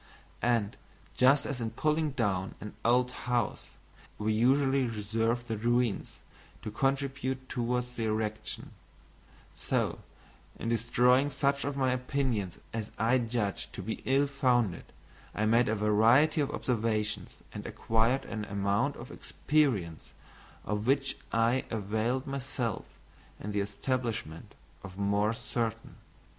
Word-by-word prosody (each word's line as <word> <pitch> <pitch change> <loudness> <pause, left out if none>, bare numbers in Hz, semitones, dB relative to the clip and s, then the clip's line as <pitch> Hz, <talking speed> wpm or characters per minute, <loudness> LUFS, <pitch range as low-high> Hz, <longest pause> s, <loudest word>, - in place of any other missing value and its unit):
And, 115 -4 +1 0.4
just 135 +3 +5
as 130 -3 -3
in 115 - -1
pulling 155 0 +2
down 100 -7 -1
an 105 - -7
old 125 +1 +3 0.2
house, 120 -3 0 0.5
we 110 +1 0
usually 135 +3 +3
reserve 115 +2 -1
the 110 -2 -2
ruins 120 -1 0 0.5
to 105 - -4
contribute 135 +1 -1
towards 125 0 -1
the 115 -2 -3
erection, 110 0 -2 0.8
so, - - -1 0.6
in 115 - -3
destroying 125 +4 +3
such 140 0 0
of 140 0 -2
my 130 -2 +2
opinions 125 -7 -1 0.2
as 110 -1 -3
I 120 +4 +3
judged 115 -4 -2
to 95 - -6
be 110 +4 -4
Ill 135 +2 +3
founded, 125 - +1 0.5
I 105 - +1
made 115 +2 +4
a 110 - +2
variety 115 +9 +4
of 140 - 0
observations 110 -3 -2
and - - -6
acquired 115 +4 +1
an 110 -2 -4
amount 100 +7 0
of 120 - -9
experience 115 - 0 0.5
of 105 +2 -2
which 135 +1 +2 0.2
I 115 +3 +2
availed 110 +5 -1
myself 135 -5 -3 0.5
in 105 - -5
the 105 - 0
establishment 105 - -3 0.3
of 95 -1 -10
more 100 +1 +2
certain. 115 -2 -3
120 Hz, 125 wpm, -30 LUFS, 105-130 Hz, 0.8 s, just